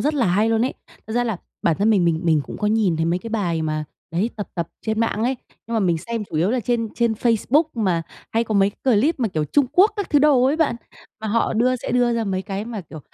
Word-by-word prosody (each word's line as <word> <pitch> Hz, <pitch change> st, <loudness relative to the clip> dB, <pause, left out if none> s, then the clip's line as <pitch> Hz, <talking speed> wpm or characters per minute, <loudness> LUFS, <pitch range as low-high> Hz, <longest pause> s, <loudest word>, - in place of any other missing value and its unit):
rất 300 Hz, +2 st, +1 dB
là 265 Hz, -7 st, +2 dB
hay 205 Hz, +5 st, +2 dB
luôn 225 Hz, 0 st, +2 dB
ấy. 255 Hz, -, -1 dB, 0.3 s
Thật 220 Hz, -, -6 dB
ra 245 Hz, +1 st, +1 dB
là 225 Hz, -5 st, -1 dB, 0.3 s
bản 165 Hz, -, +2 dB
thân 210 Hz, +3 st, +3 dB
mình 195 Hz, -5 st, +3 dB
mình 165 Hz, -1 st, +1 dB
mình 160 Hz, -3 st, +3 dB
cũng -, -, -8 dB
có 210 Hz, -, -1 dB
nhìn 210 Hz, -6 st, +2 dB
thấy 160 Hz, -, 0 dB
mấy 170 Hz, +2 st, +1 dB
cái 230 Hz, -, -8 dB
bài 175 Hz, -7 st, -1 dB
mà 155 Hz, -1 st, -2 dB, 0.3 s
đấy, 190 Hz, +8 st, 0 dB
tập 205 Hz, -, -5 dB
tập 170 Hz, -2 st, -3 dB, 0.2 s
trên 220 Hz, 0 st, 0 dB
mạng 225 Hz, -1 st, 0 dB
ấy, 255 Hz, +2 st, +1 dB, 0.3 s
nhưng 230 Hz, -, -4 dB
mà -, -, +2 dB
mình 175 Hz, -4 st, +1 dB
xem 230 Hz, +4 st, -4 dB
chủ 155 Hz, -, -6 dB
yếu 175 Hz, +6 st, +2 dB
là 250 Hz, +1 st, +1 dB
trên 230 Hz, 0 st, -1 dB
trên 235 Hz, -2 st, +1 dB
Facebook 235 Hz, +6 st, +2 dB
mà 185 Hz, -7 st, 0 dB, 0.3 s
hay 230 Hz, +1 st, +2 dB
có 215 Hz, -, -3 dB
mấy 200 Hz, 0 st, +4 dB
cái 250 Hz, +3 st, 0 dB
clip 280 Hz, +6 st, +1 dB
mà, 230 Hz, -, +1 dB
kiểu, 155 Hz, -5 st, -1 dB
Trung 270 Hz, -, +2 dB
Quốc 380 Hz, +6 st, +5 dB
các 405 Hz, -, -3 dB
thứ 295 Hz, -, +5 dB
đồ 280 Hz, -4 st, +4 dB
ấy 280 Hz, +4 st, +2 dB
bạn, 320 Hz, -7 st, +1 dB, 0.4 s
mà 220 Hz, -, -4 dB
họ 225 Hz, +2 st, +1 dB
đưa 250 Hz, +3 st, +2 dB
sẽ -, -, -6 dB
đưa 245 Hz, -1 st, +3 dB
ra 230 Hz, -1 st, 0 dB
mấy 190 Hz, -1 st, -2 dB
cái 200 Hz, +1 st, -4 dB
mà, 225 Hz, -2 st, -5 dB
kiểu, 160 Hz, -3 st, -11 dB
220 Hz, 285 wpm, -22 LUFS, 185-240 Hz, 0.4 s, Quốc